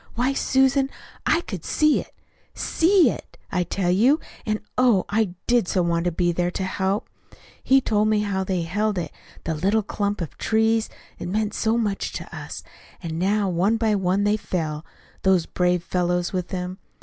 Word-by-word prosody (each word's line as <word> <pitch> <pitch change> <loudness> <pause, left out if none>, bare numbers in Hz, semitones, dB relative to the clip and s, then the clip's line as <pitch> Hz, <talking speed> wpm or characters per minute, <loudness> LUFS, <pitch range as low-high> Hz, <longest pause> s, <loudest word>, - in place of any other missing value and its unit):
Why, 250 +4 +1
Susan, 270 0 +2 0.4
I 330 - +3
could 190 - -7
see 305 -1 +3
it - - -14 0.4
SEE 335 - +3
it, - - -10
I 180 -2 +1
tell 175 +1 -1
you, 245 - +4 0.3
and, 215 0 0 0.2
oh, 245 -7 +4
I 205 -4 0
did 240 -6 +2
so 180 -1 +1
want 170 0 0
to 175 - +2
be 175 +1 +1
there 175 +1 0
to 190 - -3
help. 190 +2 -1 0.6
He 270 0 +5
told 215 -3 +1
me 215 -1 +2
how 200 -2 -1
they 185 -2 -1
held 205 +4 -1
it 165 -4 -3 0.3
the 165 - -1
little 200 +8 +1
clump 205 0 -2
of 170 -4 -6
trees 220 0 +2 0.3
that - - -5
meant 210 +3 -1
so 225 +1 +1
much 210 -4 -1
to - - -4
US, - - -7 0.4
and 165 0 -3
how 200 +1 +2
one 190 +6 +2
by 225 -2 +1
one 190 0 +1
they 205 +1 +2
fell 155 -6 -3 0.4
those 190 -3 +3
brave 180 -1 0
fellows 180 0 0
with 180 -2 -2
him. 185 0 -4
200 Hz, 185 wpm, -24 LUFS, 180-220 Hz, 0.6 s, He